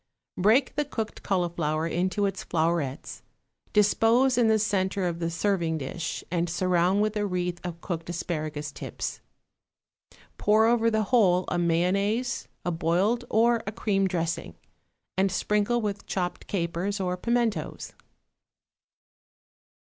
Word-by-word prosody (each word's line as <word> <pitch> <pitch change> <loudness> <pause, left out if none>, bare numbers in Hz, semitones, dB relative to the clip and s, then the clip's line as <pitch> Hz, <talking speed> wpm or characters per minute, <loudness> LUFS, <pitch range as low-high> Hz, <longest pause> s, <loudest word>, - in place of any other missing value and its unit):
= - - -63
Break 225 +8 +3
the 295 - +3
cooked 225 -6 -5
cauliflower 170 -4 0
into 185 +5 0
its 195 -1 -2
flowerets, 160 -4 -1 0.5
dispose 225 +5 +4
in 240 -2 +3
the 220 0 +4
centre 195 -2 0
of 170 -1 -3
the 165 -1 -1
serving 170 -2 0
dish 155 +4 -4
and 175 -1 0
surround 185 +3 +2
with 215 0 -1
a 210 - 0
wreath 180 -2 -2
of 170 -2 -6
cooked 170 -3 -4
asparagus 155 -3 -3
tips. - - -5 1.2
Pour 215 +1 +4
over 230 0 +3
the 220 -1 +1
whole 190 -5 +3
a 175 - 0
mayonnaise, 195 +8 +1 0.2
a 175 - +1
boiled 185 +9 +1
or 230 +1 +3
a - - -1
cream 200 -3 +1
dressing, 165 - -2 0.6
and 195 0 +3
sprinkle 210 +5 +1
with 205 -2 -4
chopped 180 -2 -3
capers 185 +2 -2
or 180 -1 -1
pimentos. 225 -4 -1
185 Hz, 130 wpm, -27 LUFS, 170-215 Hz, 1.2 s, dispose